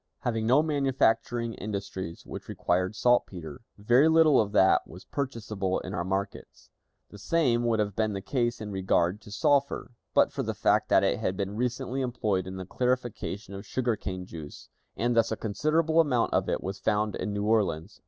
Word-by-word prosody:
Having 115 Hz, -2 st, -1 dB
no 135 Hz, +6 st, +5 dB
manufacturing 120 Hz, -5 st, +1 dB
industries 100 Hz, -5 st, -6 dB
which -, -, -8 dB
required 90 Hz, +3 st, 0 dB
saltpeter, 90 Hz, -, 0 dB, 0.2 s
very 120 Hz, +8 st, +4 dB
little 160 Hz, -4 st, +5 dB
of 105 Hz, -2 st, -3 dB
that 95 Hz, -2 st, +5 dB
was -, -, -12 dB
purchasable 110 Hz, -8 st, -3 dB
in -, -, -7 dB
our 85 Hz, -, -1 dB
markets. 95 Hz, +2 st, -5 dB, 0.4 s
The 105 Hz, -, -11 dB
same 120 Hz, 0 st, +1 dB
would 115 Hz, -1 st, +2 dB
have 105 Hz, -2 st, -1 dB
been 110 Hz, -1 st, 0 dB
the 100 Hz, -, -4 dB
case 120 Hz, +2 st, -1 dB
in 105 Hz, -2 st, -6 dB
regard 95 Hz, 0 st, +1 dB
to 105 Hz, -, -13 dB
sulphur, 140 Hz, +2 st, +1 dB, 0.2 s
but -, -, +5 dB
for -, -, -2 dB
the -, -, -3 dB
fact -, -, +2 dB
that -, -, +5 dB
it -, -, +1 dB
had 95 Hz, -, -2 dB
been 100 Hz, 0 st, -3 dB
recently 125 Hz, +3 st, -2 dB
employed 110 Hz, -7 st, -1 dB
in 95 Hz, -, -6 dB
the 95 Hz, 0 st, -6 dB
clarification 120 Hz, -3 st, -2 dB
of 100 Hz, 0 st, -7 dB
sugar 120 Hz, +1 st, -1 dB
cane 95 Hz, -3 st, -5 dB
juice, 80 Hz, -5 st, -10 dB, 0.3 s
and 120 Hz, +2 st, +1 dB
thus 115 Hz, -1 st, +3 dB
a 110 Hz, -, -1 dB
considerable 155 Hz, +9 st, +1 dB
amount 130 Hz, -7 st, +2 dB
of -, -, +1 dB
it -, -, -1 dB
was 95 Hz, +1 st, -4 dB
found 105 Hz, -1 st, 0 dB
in 105 Hz, -, -3 dB
New 105 Hz, 0 st, -2 dB
Orleans. 100 Hz, -4 st, 0 dB
110 Hz, 185 wpm, -28 LUFS, 95-125 Hz, 0.4 s, no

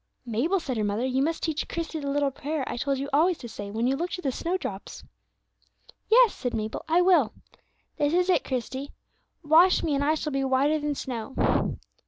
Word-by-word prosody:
"Mabel," 255 Hz, -, 0 dB
said 260 Hz, -7 st, -4 dB
her 215 Hz, -, 0 dB
mother, 205 Hz, +4 st, -1 dB
"you 260 Hz, +1 st, 0 dB
must 325 Hz, +3 st, -1 dB
teach 310 Hz, -2 st, -1 dB
Christie 330 Hz, -1 st, -4 dB
the 280 Hz, -1 st, -4 dB
little 285 Hz, 0 st, +1 dB
prayer 290 Hz, +2 st, -3 dB
I -, -, -4 dB
told 275 Hz, +3 st, -1 dB
you 275 Hz, +1 st, -3 dB
always 330 Hz, +4 st, +3 dB
to 240 Hz, -, -8 dB
say 205 Hz, -3 st, -7 dB
when 225 Hz, +3 st, -2 dB
you 265 Hz, +2 st, +2 dB
looked 345 Hz, +5 st, -3 dB
at 360 Hz, -, -9 dB
the 270 Hz, -, 0 dB
snowdrops." 330 Hz, -, -4 dB, 1.1 s
"Yes," 475 Hz, -1 st, +6 dB
said 245 Hz, -, -3 dB
Mabel, 215 Hz, 0 st, -3 dB
"I 340 Hz, +3 st, +4 dB
will. 345 Hz, -, +4 dB, 0.6 s
This 290 Hz, 0 st, +1 dB
is 360 Hz, 0 st, +2 dB
it, 370 Hz, -, +3 dB
Christie: 260 Hz, +2 st, -4 dB, 0.5 s
'Wash 325 Hz, +5 st, +5 dB
me, 320 Hz, -3 st, 0 dB
and 280 Hz, 0 st, +1 dB
I 305 Hz, +2 st, +2 dB
shall 300 Hz, -1 st, -3 dB
be 275 Hz, 0 st, 0 dB
whiter 270 Hz, +4 st, +2 dB
than 295 Hz, -1 st, -2 dB
snow.'" 255 Hz, -1 st, -1 dB
285 Hz, 205 wpm, -26 LUFS, 255-325 Hz, 1.1 s, Yes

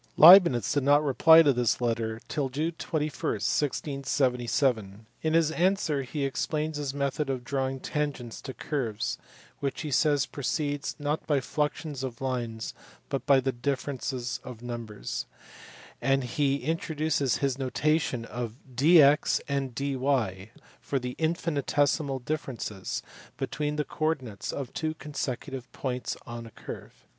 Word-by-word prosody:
Leibnitz 170 Hz, -, +9 dB
did 145 Hz, -, +2 dB
not 145 Hz, +2 st, +4 dB
reply 160 Hz, +4 st, +7 dB
to 145 Hz, -3 st, +4 dB
this 120 Hz, -2 st, +1 dB
letter 115 Hz, -2 st, -1 dB
till 145 Hz, -4 st, -1 dB
June 155 Hz, +6 st, -1 dB
21, 155 Hz, -2 st, -1 dB
1677. 125 Hz, -3 st, 0 dB, 0.2 s
In 160 Hz, 0 st, 0 dB
his 165 Hz, -2 st, +4 dB
answer 175 Hz, -4 st, +1 dB
he 140 Hz, +2 st, -3 dB
explains 155 Hz, +3 st, -1 dB
his 145 Hz, -2 st, -2 dB
method 140 Hz, +1 st, -1 dB
of 130 Hz, -2 st, -2 dB
drawing 135 Hz, 0 st, -2 dB
tangents 140 Hz, -5 st, -3 dB
to 135 Hz, -, -6 dB
curves, 115 Hz, -, -3 dB, 0.4 s
which 140 Hz, -2 st, -2 dB
he 150 Hz, -, -4 dB
says 145 Hz, 0 st, +3 dB
proceeds 145 Hz, +1 st, -2 dB
"not 150 Hz, +1 st, -2 dB
by 145 Hz, -3 st, +3 dB
fluxions 150 Hz, 0 st, -2 dB
of 125 Hz, -3 st, -5 dB
lines 120 Hz, -4 st, -3 dB, 0.4 s
but 135 Hz, 0 st, -3 dB
by 140 Hz, -2 st, +6 dB
the 135 Hz, +1 st, 0 dB
differences 130 Hz, -1 st, -3 dB
of 125 Hz, -2 st, -9 dB
numbers"; 110 Hz, -, -5 dB, 0.7 s
and 135 Hz, 0 st, +2 dB
he 140 Hz, +2 st, 0 dB
introduces 155 Hz, -3 st, 0 dB
his 135 Hz, -1 st, -1 dB
notation 145 Hz, -1 st, 0 dB
^f 120 Hz, -2 st, -5 dB, 0.2 s
dx 150 Hz, +2 st, +6 dB
and 135 Hz, -3 st, -2 dB
dy 130 Hz, -8 st, -1 dB, 0.3 s
for 140 Hz, -, -2 dB
the 125 Hz, -1 st, -4 dB
infinitesimal 145 Hz, -3 st, +1 dB
differences 125 Hz, -7 st, -4 dB, 0.3 s
between 150 Hz, 0 st, -2 dB
the 150 Hz, -1 st, -1 dB
co 155 Hz, -, -3 dB
ordinates 130 Hz, -10 st, -2 dB
of 135 Hz, -3 st, -5 dB
two 155 Hz, 0 st, -2 dB
consecutive 135 Hz, -3 st, -5 dB
points 125 Hz, -2 st, -3 dB
on 115 Hz, 0 st, -7 dB
a -, -, -10 dB
curve. -, -, -10 dB
135 Hz, 135 wpm, -28 LUFS, 125-150 Hz, 0.7 s, Leibnitz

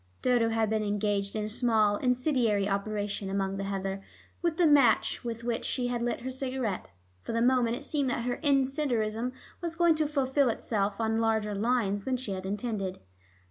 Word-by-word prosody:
Dodo 240 Hz, -2 st, +3 dB
had 225 Hz, -1 st, +1 dB
been 220 Hz, 0 st, 0 dB
engaged 205 Hz, -1 st, -1 dB
in 215 Hz, -, -1 dB
a -, -, -3 dB
small 215 Hz, -2 st, +2 dB
incendiary 250 Hz, -5 st, +1 dB
operation 205 Hz, 0 st, -2 dB
among 195 Hz, 0 st, -1 dB
the 195 Hz, -, -3 dB
heather, 195 Hz, 0 st, -3 dB, 0.4 s
with 340 Hz, -2 st, 0 dB
the 350 Hz, -, +4 dB
match 280 Hz, -8 st, +4 dB
with 235 Hz, -1 st, -5 dB
which 235 Hz, -1 st, -2 dB
she 245 Hz, -2 st, -1 dB
had 240 Hz, -1 st, -2 dB
lit 240 Hz, 0 st, -1 dB
her 260 Hz, +2 st, -4 dB
cigarette. 255 Hz, -6 st, -3 dB, 0.3 s
For -, -, -5 dB
the 230 Hz, -, +1 dB
moment 245 Hz, -2 st, +3 dB
it 280 Hz, +3 st, -8 dB
seemed 285 Hz, -4 st, 0 dB
that 240 Hz, -1 st, -1 dB
her 245 Hz, 0 st, -2 dB
incendiarism 260 Hz, -5 st, +1 dB, 0.3 s
was 340 Hz, -1 st, -3 dB
going 340 Hz, -1 st, +4 dB
to 310 Hz, -1 st, 0 dB
fulfil 275 Hz, -2 st, +2 dB
itself 210 Hz, -2 st, -1 dB
on 225 Hz, 0 st, +1 dB
larger 220 Hz, -2 st, +1 dB
lines 205 Hz, -2 st, 0 dB
than 260 Hz, -1 st, 0 dB
she 245 Hz, -5 st, -5 dB
had 190 Hz, 0 st, -4 dB
intended. 205 Hz, -2 st, -3 dB
230 Hz, 185 wpm, -29 LUFS, 205-255 Hz, 0.4 s, the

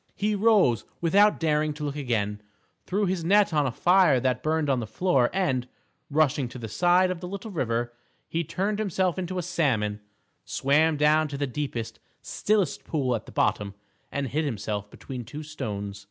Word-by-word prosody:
He 210 Hz, +1 st, 0 dB
rose 205 Hz, -, +3 dB, 0.2 s
without 200 Hz, +5 st, +4 dB
daring 155 Hz, -1 st, +1 dB
to 150 Hz, -, -6 dB
look 145 Hz, -1 st, -3 dB
again, 110 Hz, -7 st, -2 dB, 0.5 s
threw 200 Hz, +3 st, +1 dB
his 185 Hz, -2 st, -1 dB
net 200 Hz, +1 st, +4 dB
on 150 Hz, -2 st, +2 dB
a -, -, -1 dB
fire 175 Hz, 0 st, +4 dB
that 125 Hz, 0 st, 0 dB
burned 155 Hz, +1 st, 0 dB
on 135 Hz, -2 st, +2 dB
the 115 Hz, -, -4 dB
floor, 135 Hz, -, +2 dB
and, 135 Hz, -10 st, 0 dB, 0.4 s
rushing 145 Hz, -3 st, +2 dB
to 130 Hz, -, -9 dB
the 115 Hz, -2 st, -6 dB
side 180 Hz, -, +3 dB
of 180 Hz, -, -4 dB
the 180 Hz, -, -6 dB
little 200 Hz, +4 st, -6 dB
river, 120 Hz, -, -1 dB, 0.3 s
he 165 Hz, +1 st, -1 dB
turned 200 Hz, +6 st, -2 dB
himself 190 Hz, -3 st, 0 dB
into 185 Hz, 0 st, -3 dB
a 180 Hz, -, -1 dB
salmon, 115 Hz, -12 st, 0 dB, 0.4 s
swam 150 Hz, +3 st, +2 dB
down 155 Hz, +1 st, +3 dB
to 140 Hz, -1 st, -6 dB
the 145 Hz, -, 0 dB
deepest, 130 Hz, -4 st, -4 dB, 0.2 s
stillest 205 Hz, -7 st, 0 dB
pool 130 Hz, -6 st, 0 dB
at 110 Hz, -, -6 dB
the -, -, -10 dB
bottom, 100 Hz, -1 st, 0 dB, 0.4 s
and 140 Hz, -2 st, -2 dB
hid 155 Hz, +5 st, 0 dB
himself 105 Hz, -6 st, -3 dB
between 130 Hz, +1 st, -8 dB
two 145 Hz, +7 st, -8 dB
stones. 105 Hz, -9 st, -5 dB
150 Hz, 185 wpm, -26 LUFS, 125-180 Hz, 0.5 s, without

